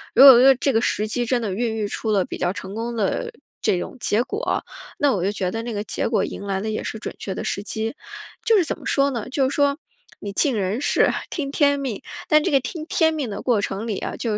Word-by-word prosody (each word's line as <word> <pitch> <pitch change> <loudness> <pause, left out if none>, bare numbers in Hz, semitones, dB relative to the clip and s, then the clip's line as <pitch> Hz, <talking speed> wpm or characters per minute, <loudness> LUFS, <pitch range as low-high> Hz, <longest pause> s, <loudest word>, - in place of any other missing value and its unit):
如 270 - +8
果 260 -3 +11
说 265 +1 +7
这 275 +2 +1
个 225 - +3
时 215 -2 0
机 240 +3 -1
真 240 0 0
的 200 -4 -2
孕 225 +1 -1
育 215 -2 -1
出 220 +1 -3
了 195 -3 +3
比 - - -7
较 175 +1 0
成 190 +1 -7
功 230 +2 -4
的 225 - -1 0.3
这 180 - +2
种 180 - -6
结 230 +2 +1
果， 420 - -2 0.4
那 285 -1 +3
我 185 - -1
就 200 - 0
觉 185 -3 -2
得 225 +2 -4
那 235 -1 -4
个 205 - -2
结 - - -2
果 215 -4 +1
迎 - - -5
来 195 -1 -2
的 220 - -3
也 215 - -2
是 - - -5
准 - - -6
确 190 - -4
的 - - -4
时 200 - -2
机。 220 +5 -3 0.5
就 450 - +5
是 375 - +5
怎 - - -3
么 - - -13
说 280 0 +2
呢， 235 -5 -4
就 265 0 +1
是 - - -4
说 285 0 +2 0.4
你 205 - -5
尽 255 +4 +2
人 200 +3 -1
事， 285 - +3 0.2
听 280 -5 -3
天 285 -1 +3
命， 260 -7 -4 0.3
但 305 0 +6
这 - - -1
个 275 -2 +4
听 310 +5 -6
天 320 -1 +2
命 285 -6 -3
的 200 - -5
过 240 -5 +2
程 200 +2 -3
里 215 -4 -2
啊， - - -4
就 230 - -3
230 Hz, 290 characters per minute, -22 LUFS, 205-275 Hz, 0.5 s, 果